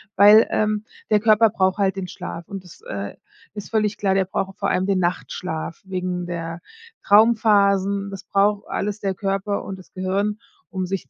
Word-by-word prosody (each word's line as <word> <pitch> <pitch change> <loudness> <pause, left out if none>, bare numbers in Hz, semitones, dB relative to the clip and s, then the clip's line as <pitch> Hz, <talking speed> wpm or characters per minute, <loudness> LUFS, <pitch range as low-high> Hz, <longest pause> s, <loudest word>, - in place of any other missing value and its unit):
weil, 210 +3 +7
ähm, 215 0 0 0.2
der 210 - +4
Körper 215 +1 +5
braucht 190 -1 +1
halt 195 -2 +1
den 190 -1 -4
Schlaf 170 -1 -7
und 195 -2 -7
das, 180 - -15
äh, - - -6 0.4
ist 205 -1 -8
völlig 215 -2 0
klar, 195 -2 +1
der 190 0 +2
braucht 195 +1 -3
vor - - -1
allem 185 +1 +1
den 195 -1 +1
Nachtschlaf 175 -2 -3
wegen 180 -1 -3
der 170 -1 -5 0.4
Traumphasen. 200 -2 +4
Das 195 -1 -8
braucht 200 +1 +1
alles 210 +1 -3
der 195 -1 -1
Körper 195 +1 -2
und 195 - -6
das 185 - -16
Gehirn, 200 +3 -1 0.3
um 185 -1 -3
sich 180 -7 -4
195 Hz, 180 wpm, -22 LUFS, 185-210 Hz, 0.4 s, weil